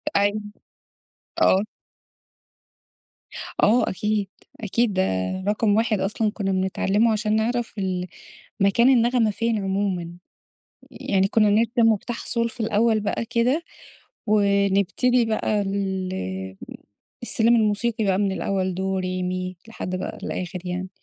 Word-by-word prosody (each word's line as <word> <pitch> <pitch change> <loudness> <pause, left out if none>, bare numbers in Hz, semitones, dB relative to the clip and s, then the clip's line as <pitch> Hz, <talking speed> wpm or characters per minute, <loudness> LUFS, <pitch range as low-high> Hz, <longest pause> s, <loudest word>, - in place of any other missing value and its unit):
أيوه، 205 +1 +2 1.0
آه. 190 +2 +5 2.0
آه، 230 +2 +4
أكيد، 210 0 -1 0.3
أكيد، 220 +1 0
ده 185 - +1 0.5
رقم 210 0 +2
واحد 220 -2 +1
أصلًا 210 +2 0
كنّا 200 -3 -2
بنتعلِّمه 195 +4 +1
عشان 215 0 0
نعرف 235 +2 -1
ال 185 -2 -2 0.5
مكان 200 +5 +4
النغمة 240 -3 +3
فين 230 +1 -1
عمومًا، 190 -3 -1 0.8
يعني 195 -1 0
كنّا 215 0 +3
بنرسم 225 +2 +3
مفتاح 230 +3 -3
صول 235 -1 0
في 245 - -13
الأول 220 0 +2
بقى 210 +2 -2
كده، 245 +8 +1 0.6
ونبتدي 200 +4 +2
بقى 215 -1 0
ال 185 - -3 0.7
السلِّم 235 0 +3
الموسيقي 220 0 +1
بقى 190 -1 +2
من 200 -1 +1
الأول 190 -1 -1
"دو 190 +1 -1
ري 185 0 -2
مي" 185 0 -3
لحد 185 -4 -5
بقى 185 - -5
الآخر 180 0 -4
يعني. 180 +1 -4
205 Hz, 120 wpm, -23 LUFS, 190-225 Hz, 2.0 s, آه